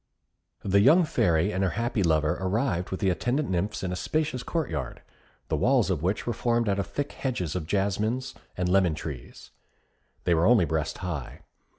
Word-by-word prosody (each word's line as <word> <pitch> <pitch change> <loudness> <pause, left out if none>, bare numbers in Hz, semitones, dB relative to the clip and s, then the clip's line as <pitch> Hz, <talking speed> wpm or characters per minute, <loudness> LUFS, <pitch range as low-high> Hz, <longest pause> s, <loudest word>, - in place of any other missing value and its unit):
The 100 0 +3
young 160 - +6
Fairy 100 - +1
and 95 +2 0
her 95 - +2
happy 120 -2 0
lover 80 -3 +2
arrived 95 -2 0
with 95 - -4
the 95 - +3
attendant 120 - -1
nymphs 95 +4 -1
in 95 - -2
a - - -2
spacious 150 +3 -1
court 165 +2 -2
yard, 70 -6 -5 0.4
the - - 0
walls 125 -6 +2
of 85 -6 -1
which 95 +5 -1
were 120 - -1
formed 115 0 0
out 100 -1 +1
of 100 - -2
thick 145 0 -3
hedges 95 - -3
of 85 -4 -3
jasmines 105 +7 -1 0.2
and 90 0 0
lemon 90 -3 +3
trees. 70 -6 -8 0.7
They 90 - +2
were 85 +1 +3
only 115 -7 +5
breast 80 -1 -2
high. 75 -8 -5
95 Hz, 190 wpm, -27 LUFS, 85-120 Hz, 0.7 s, young